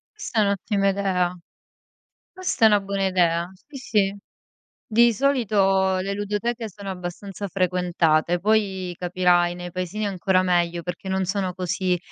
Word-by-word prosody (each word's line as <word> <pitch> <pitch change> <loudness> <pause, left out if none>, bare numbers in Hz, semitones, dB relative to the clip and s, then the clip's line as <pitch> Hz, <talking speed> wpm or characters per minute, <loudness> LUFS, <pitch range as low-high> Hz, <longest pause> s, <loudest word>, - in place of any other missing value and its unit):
Questa 260 - -3
è - - +6
un'ottima 200 0 +1
idea. 185 -2 0 1.0
Questa 370 -11 0
è - - +9
una 210 -1 +4
buona 195 0 -1
idea, 175 -2 +1
sì, 275 - -15
sì. 205 -6 0 0.7
Di 235 +1 +5
solito 195 -7 +2
le 195 +2 -2
ludoteche 210 +3 -2
sono 200 0 -8
abbastanza 190 +2 -6
frequentate, 175 -3 +1
poi 195 -3 0
capirai, 175 -1 +2
nei 175 0 -7
paesini 185 +4 -3
ancora 185 -1 +1
meglio 175 -1 +1
perché 180 +2 -6
non 190 0 0
sono 190 -1 -2
così 185 0 -1
190 Hz, 140 wpm, -23 LUFS, 180-205 Hz, 1.0 s, è